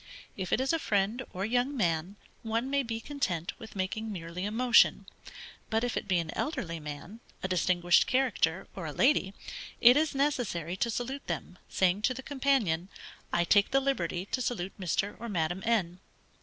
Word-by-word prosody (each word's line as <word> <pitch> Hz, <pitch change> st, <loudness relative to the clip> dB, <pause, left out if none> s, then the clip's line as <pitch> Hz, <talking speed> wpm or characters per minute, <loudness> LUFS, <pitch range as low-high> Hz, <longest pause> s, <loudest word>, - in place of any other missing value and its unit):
If 185 Hz, -2 st, -4 dB
it -, -, +3 dB
is 265 Hz, +4 st, +1 dB
a 330 Hz, -, +1 dB
friend, 210 Hz, 0 st, 0 dB
or 190 Hz, +2 st, -3 dB
young 250 Hz, +5 st, 0 dB
man, 170 Hz, -1 st, 0 dB, 0.3 s
one 230 Hz, +4 st, -2 dB
may 280 Hz, 0 st, +3 dB
be 230 Hz, -3 st, -4 dB
content 190 Hz, -, -2 dB
with 220 Hz, -, -11 dB
making 215 Hz, +3 st, -2 dB
merely 175 Hz, 0 st, -5 dB
a 205 Hz, -, -2 dB
motion; 240 Hz, +1 st, +4 dB, 0.6 s
but 225 Hz, 0 st, +1 dB
if 245 Hz, -, -1 dB
it -, -, -3 dB
be 185 Hz, -3 st, +2 dB
an 165 Hz, -2 st, -3 dB
elderly 170 Hz, -, -2 dB
man, 150 Hz, +8 st, -8 dB, 0.2 s
a -, -, 0 dB
distinguished 175 Hz, -1 st, +3 dB
character, 260 Hz, +1 st, +1 dB
or -, -, -5 dB
a -, -, -4 dB
lady, 200 Hz, -9 st, +2 dB, 0.4 s
it 245 Hz, +2 st, +8 dB
is 305 Hz, -1 st, +1 dB
necessary 240 Hz, -, 0 dB
to 235 Hz, +5 st, 0 dB
salute 255 Hz, +5 st, -4 dB
them, 180 Hz, -, -5 dB
saying 185 Hz, +2 st, +2 dB
to 255 Hz, +4 st, +1 dB
the 265 Hz, -, -7 dB
companion: 255 Hz, -, +1 dB, 0.4 s
_I 170 Hz, 0 st, +1 dB
take 205 Hz, +2 st, +5 dB
the 270 Hz, -, +3 dB
liberty 185 Hz, -10 st, -1 dB
to 255 Hz, -, 0 dB
salute 195 Hz, -6 st, -2 dB
Mr. 195 Hz, +3 st, -1 dB
or 235 Hz, -, -5 dB
Madam 175 Hz, -1 st, -1 dB
N. 185 Hz, -6 st, +1 dB
210 Hz, 185 wpm, -30 LUFS, 180-255 Hz, 0.6 s, it